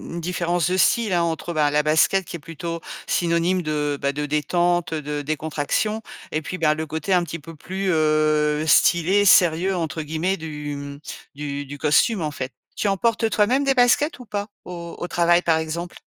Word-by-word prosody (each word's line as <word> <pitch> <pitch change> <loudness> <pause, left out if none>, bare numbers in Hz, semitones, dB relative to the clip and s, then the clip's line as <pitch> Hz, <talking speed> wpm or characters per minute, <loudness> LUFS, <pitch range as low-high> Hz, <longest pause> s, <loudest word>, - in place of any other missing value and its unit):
une 170 - -4
différence 175 0 0
de 185 - +1
style, 220 +1 +3
hein, 175 - +3
entre, 170 +1 -2
bah, 150 -2 +2
la 150 +1 +2
basket 160 +5 +3
qui 170 - -6
est - - -16
plutôt 165 +3 -6 0.3
synonyme 170 +1 +1
de, 150 -2 -2
bah, 140 0 0
de 150 +1 -3
détente, 175 +3 0
heu, 155 - -2
de 150 0 -4
décontraction, 155 +8 -2 0.3
et 155 - -1
puis 185 +4 -5
ben 155 -3 +3
le 160 +1 -4
côté 160 +5 -2
un 180 -1 +3
petit 170 +1 -6
peu 165 +2 -11
plus, 190 +5 -4
heu, 155 -1 +2
stylé, 175 +5 +4
«sérieux» 180 0 +4
entre 160 -2 -3
guillemets 160 +5 -1
du, 150 -2 -6
mmh, 140 0 -8 0.4
du 145 -1 -4
du 145 +2 -8
costume, 160 +8 +2
en 155 - -2
fait. 130 -2 -5 0.2
Tu 210 - -1
en 195 -1 +1
portes 230 0 +1
toi-même 235 +7 +2
des 270 -1 +2
baskets, 255 +5 +3
ou 250 - -10
pas, 205 -1 -4 0.2
au 170 -1 -7
au 175 - -4
travail, 175 0 +3
par 165 -1 +3
exemple? 170 +2 -5
165 Hz, 200 wpm, -22 LUFS, 150-185 Hz, 0.4 s, stylé